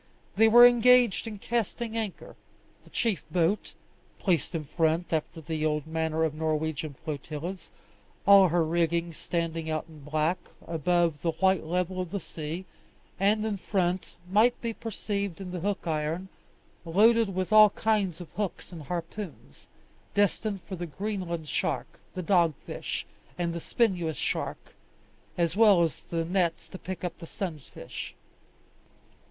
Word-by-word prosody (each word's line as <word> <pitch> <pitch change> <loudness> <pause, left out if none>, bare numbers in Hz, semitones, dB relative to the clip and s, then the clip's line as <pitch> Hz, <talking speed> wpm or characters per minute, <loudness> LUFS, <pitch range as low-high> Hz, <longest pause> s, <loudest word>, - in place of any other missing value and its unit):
They 225 +3 +6
were 240 +2 +9
engaged 245 -2 +5
in 215 -2 -5
casting 230 +1 -2
anchor: 220 -4 -4 0.5
the - - -18
chief 225 -6 -1
boat, 180 +4 +1 0.4
placed 175 -2 0
in 160 - -2
front 160 +3 0
after 160 +1 -2
the 155 0 -3
old 150 -2 0
manner 160 0 -1
of 160 -2 +1
Norwegian 155 -1 -2
flotillas, 155 +5 -5 0.6
all 200 -2 +8
her 170 -1 +2
rigging 170 +1 0
standing 165 0 -3
out 155 -1 -1
in 160 -2 -14
black, 155 +5 0 0.3
above 170 -1 +1
the 165 +1 0
white 190 -2 +2
level 180 +2 -1
of 180 - -5
the 200 - -3
sea; 160 +2 -6 0.5
and 210 +2 +3
in 215 -2 -1
front 185 -2 -1
might 215 +6 +4
be 230 -1 -3
perceived 200 -4 -3
the 180 - -4
hook 200 +3 -2
iron, 160 +3 -2 0.5
loaded 210 +4 +4
with 185 +3 -1
all 215 -1 +9
kinds 200 -5 0
of 175 -3 -9
hooks 200 -1 -4
and 170 -3 -8
harpoons, 170 +4 -7 0.5
destined 205 0 +1
for 190 - -6
the 175 -1 -5
Greenland 180 -3 -4
shark, - - -2 0.2
the 185 - -3
dogfish, 170 -5 0 0.3
and 170 -1 -1
the 170 - -4
spinous 180 -9 0
shark, - - -3 0.6
as 170 0 +1
well 205 -5 +6
as 165 - -1
the 165 -1 -1
nets 175 -1 0
to 185 - -9
pick 185 -1 -6
up 175 -2 -4
the 165 - -9
sunfish. 160 -7 -6
175 Hz, 145 wpm, -28 LUFS, 160-200 Hz, 0.6 s, were